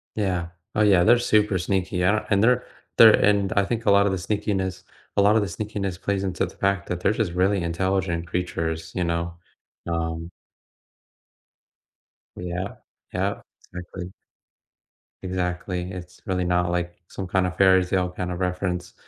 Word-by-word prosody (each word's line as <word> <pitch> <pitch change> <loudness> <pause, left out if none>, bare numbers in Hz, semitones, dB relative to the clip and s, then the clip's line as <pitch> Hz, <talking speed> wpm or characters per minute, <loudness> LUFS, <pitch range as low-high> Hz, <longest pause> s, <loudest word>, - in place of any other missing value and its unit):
Yeah. 90 -5 -1 0.3
Oh, 105 - +2
yeah. 100 -4 +5
They're 120 +6 +6
super 105 -4 +2
sneaky 95 0 -1
yeah 95 +4 +2
and 100 0 +3
they're 125 +1 +4 0.3
they're 110 -2 +9
and 100 -2 +3
I 100 - +3
think 115 +2 -3
a 100 - +5
lot 100 0 +5
of 100 - +2
the 95 - -1
sneakiness 95 -1 -2 0.3
a - - +6
lot 100 +2 +5
of 110 - +4
the 100 - -1
sneakiness 100 -3 -4
plays 100 -1 -1
into 95 -2 -1
the - - -11
fact 100 0 0
that 90 0 -3
they're 100 - +3
just 110 -5 -1
really 95 +2 +2
intelligent 85 0 -1
creatures, 80 -2 -3
you 90 - 0
know, 85 0 -1 0.5
um 85 0 -3 2.1
Yeah, 90 +2 -4 0.4
yeah, 95 +3 -1 0.3
exactly. 90 0 -7 1.1
Exactly, 90 0 -3
it's 90 -1 -9
really 90 -1 -1
not 90 0 +1
like 85 0 -2
some 95 - -6
kind 95 0 +1
of 90 0 -4
fairy 95 -1 +6
tale 90 0 0
kind 90 0 -4
of 90 - -4
reference, 90 -1 -2
95 Hz, 165 wpm, -24 LUFS, 90-100 Hz, 2.1 s, they're